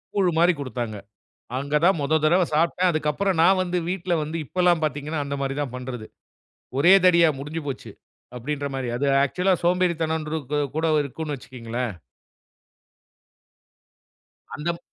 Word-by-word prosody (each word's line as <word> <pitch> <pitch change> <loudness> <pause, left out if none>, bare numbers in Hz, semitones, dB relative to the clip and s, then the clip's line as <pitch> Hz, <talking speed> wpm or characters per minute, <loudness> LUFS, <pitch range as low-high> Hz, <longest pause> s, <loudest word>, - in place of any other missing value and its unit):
கூழு 185 -3 +3
மாரி 175 +1 +5
குடுத்தாங்க. 120 -5 -4 0.6
அங்க 140 +3 -1
தான் 185 -3 +4
மொத 155 +3 +2
தடவ 175 +3 +4
சாப்ட்டேன். 170 +3 +2
அதுக்கப்புறம், 155 +5 0
நான் 185 +2 +5
வந்து 180 0 -1
வீட்டுல 180 -1 -1
வந்து 155 +2 -4
இப்பல்லாம் 175 +1 +2
பாத்தீங்கன்னா, 150 +1 -2
அந்த 140 0 -4
மாரி 135 0 -2
தான் 130 -4 -4
பண்றது. 125 -3 -6 0.7
"ஒரே 175 +7 +7
தடவையா 170 -2 +6
முடிஞ்சுபோச்சு." 145 -1 -5 0.5
அப்படின்ற 145 +3 -3
மாரி. 130 -2 -3
அது 140 +3 -1 0.2
ஆக்சுவல்லா 180 +6 +1
சோம்பேறித்தன 170 -3 +1
ன்று, 155 +1 -3
கூ - - +2 0.2
கூட 160 +1 +1 0.2
இருக்கும்ன்னு 145 +1 -5
வச்சுக்கங்களேன். 120 -2 -5 2.6
அந்தம் 170 +2 -3
155 Hz, 135 wpm, -24 LUFS, 140-175 Hz, 2.6 s, ஒரே